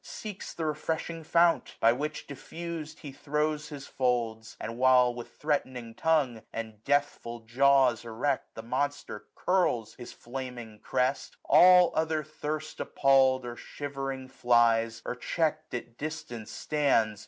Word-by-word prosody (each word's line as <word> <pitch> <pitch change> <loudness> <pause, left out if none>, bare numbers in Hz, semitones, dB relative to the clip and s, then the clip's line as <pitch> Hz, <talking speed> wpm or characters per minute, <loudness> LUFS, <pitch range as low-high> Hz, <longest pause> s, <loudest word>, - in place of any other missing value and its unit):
Seeks 210 -3 -7
the 165 - -3
refreshing 160 +2 -3
fount; 170 +1 +2
by 115 +1 +5
which 150 +5 -4
diffused. 155 +2 -7
He 145 - -7
throws 150 +2 -2
his 145 -2 -8
folds: 115 -3 -1
and 115 +1 -6
while, 125 -1 +5
with 120 0 -9
threatning 130 -6 -2
tongue. 140 -7 +1
And 110 -2 -7
deathful 140 -5 -1
jaws 130 +1 +3
erect, 125 +4 -2
the 115 - -7
monster 130 -2 -3
curls 175 - +1
His 120 -1 -10
flaming 120 -3 -7
crest, 130 +4 -1
all 180 +4 +7
other 160 -1 0
thirst 155 +1 -5
appalPd, 135 -1 +3
905 - - -8
Or 120 0 -5
shivering 135 -2 -5
flies, 115 -3 +2
or - - -2
checked 155 +2 -1
at 120 -1 -7
distance 130 -7 -6
stands. 115 -9 +1
135 Hz, 135 wpm, -29 LUFS, 120-155 Hz, -, all